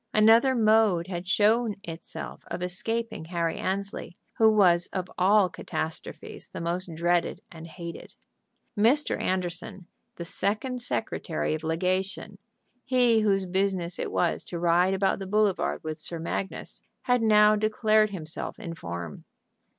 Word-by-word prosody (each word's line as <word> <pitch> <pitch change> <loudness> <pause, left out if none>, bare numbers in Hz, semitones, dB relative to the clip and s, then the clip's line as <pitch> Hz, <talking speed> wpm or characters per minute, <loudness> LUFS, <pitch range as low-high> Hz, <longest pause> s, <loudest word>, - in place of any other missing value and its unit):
Another 225 +5 +6
mode 215 -6 +3
had 180 -1 -6
shown 215 +3 +3
itself 165 -2 -8
of 175 +1 -4
escaping 225 +2 -3
Harry 170 -1 -2
Annesley, 195 -2 -3 0.2
who 220 -1 +7
was 180 -5 +4
of 185 -1 -5
all 195 +2 +4
catastrophes 160 -2 -6
the - - -8
most 175 +2 -3
dreaded 175 +1 0
and 165 -1 -10
hated. 170 0 -9 0.6
Mr. 240 +8 +2
Anderson, 185 +1 -3 0.3
the 170 - -6
second 220 +8 -1
secretary 175 -10 -2
of 155 0 -4
legation, 185 +4 -2 0.4
he 245 -3 +3
whose 195 -3 +2
business 185 -2 -1
it - - -3
was 175 - 0
to 175 - -5
ride 175 +2 +3
about 195 0 +1
the 195 - -6
boulevard 210 -1 +1
with 155 -1 -5
Sir 170 - -3
Magnus, 170 +4 -5 0.2
had 245 -1 +2
now 210 -1 +5
declared 215 0 +2
himself 165 -5 -4
in 170 - -6
form. 85 - -7
190 Hz, 135 wpm, -27 LUFS, 170-215 Hz, 0.6 s, who